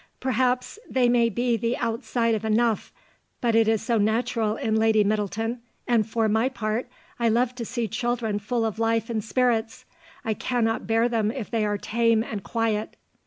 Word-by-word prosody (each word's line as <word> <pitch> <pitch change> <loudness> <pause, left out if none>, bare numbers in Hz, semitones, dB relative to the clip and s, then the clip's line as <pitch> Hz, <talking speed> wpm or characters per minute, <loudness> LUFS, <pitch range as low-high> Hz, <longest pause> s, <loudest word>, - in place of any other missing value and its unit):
Perhaps 255 - 0
they 255 -2 +3
may 240 -1 +3
be 240 +3 0
the 230 +2 -1
outside 230 0 0
of 215 -1 -2
enough, 220 0 +1 0.5
but 235 -2 +1
it 225 -1 +4
is 220 -1 +2
so 235 -3 +1
natural 220 0 +1
in 220 -1 -1
Lady 220 -1 +4
Middleton, 215 +3 -1 0.3
and 225 -3 +2
for 225 0 +1
my 220 +4 +2
part 235 -1 -2 0.3
I 235 -1 +3
love 240 +2 +2
to 245 -2 -5
see 235 0 -2
children 225 -1 -1
full 225 +3 -1
of 220 0 -3
life 225 0 +1
and 220 -2 -1
spirits; 230 -1 0 0.4
I 220 - +1
cannot 225 0 -1
bear 225 +1 +3
them 225 -3 0
if 235 -2 -5
they 225 -2 +1
are 205 0 0
tame 230 +1 +2
and 210 -4 -6
quiet. 225 -2 -1
225 Hz, 180 wpm, -25 LUFS, 220-240 Hz, 0.5 s, it